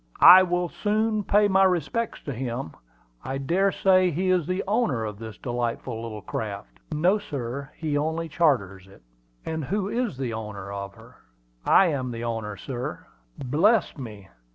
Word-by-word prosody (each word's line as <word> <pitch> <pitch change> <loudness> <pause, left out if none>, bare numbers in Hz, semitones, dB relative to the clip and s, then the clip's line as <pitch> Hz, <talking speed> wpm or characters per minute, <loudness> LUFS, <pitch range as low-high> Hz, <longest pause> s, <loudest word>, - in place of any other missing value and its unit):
"I 185 +1 +11
will 180 -1 0
soon 215 +2 0
pay 205 +2 +4
my 195 -1 +4
respects 190 +5 0
to 140 - -4
him. 120 -8 -4 0.5
I 135 - -3
dare 180 +8 +1
say 185 -1 +4
he 185 +3 0
is 180 -4 +1
the 185 +1 -1
owner 195 - +1
of 105 -1 -6
this 110 -1 -8
delightful 120 -1 -3
little 110 -3 -7
craft." 100 - -6
"No, 175 +7 +2
sir; 140 - -5
he 155 -2 -2
only 160 +3 -1
charters 110 - 0
her." 95 - -18 0.4
"And 160 -1 -3
who 200 +5 -1
is 235 - -2
the 130 -3 -3
owner 105 -3 -6
of 100 0 -6
her?" 115 +3 -16 0.5
"I 195 - +6
am 130 -4 -2
the 115 -1 -5
owner, 110 -3 -3
sir." 125 +5 -6 0.4
"Bless 175 - +3
me! 105 -8 -9
140 Hz, 165 wpm, -25 LUFS, 115-185 Hz, 0.5 s, I